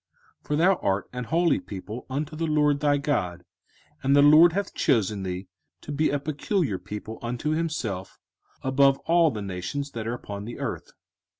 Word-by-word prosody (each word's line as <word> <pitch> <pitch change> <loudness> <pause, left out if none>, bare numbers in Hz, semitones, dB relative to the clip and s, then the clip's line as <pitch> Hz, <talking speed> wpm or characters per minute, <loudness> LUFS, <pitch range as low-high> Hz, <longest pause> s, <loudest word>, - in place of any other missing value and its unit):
05:014:002 - - -27
For 150 - 0
thou 180 +5 +4
art 95 0 -1
an 125 0 -3
holy 170 +5 +2
people 105 +4 -8
unto 150 +3 -3
the 165 +1 -2
LORD 150 -2 +2
thy 145 -1 +3
God, 90 - -2 0.6
and 135 +1 +3
the 145 - +7
LORD 155 +3 +8
hath 200 +2 -2
chosen 105 -3 +1
thee 95 0 -4 0.3
to - - -8
be 150 +2 +1
a 145 - +1
peculiar 145 - -1
people 105 +3 -7
unto 120 +5 -2
himself, 150 - -3 0.5
above 135 +1 +4
all 170 -1 +4
the 105 -7 -5
nations 100 +10 -4
that 115 -1 -5
are 120 - -1
upon 100 -4 -7
the 120 - -7
earth. - - -5
140 Hz, 180 wpm, -26 LUFS, 105-150 Hz, 0.6 s, LORD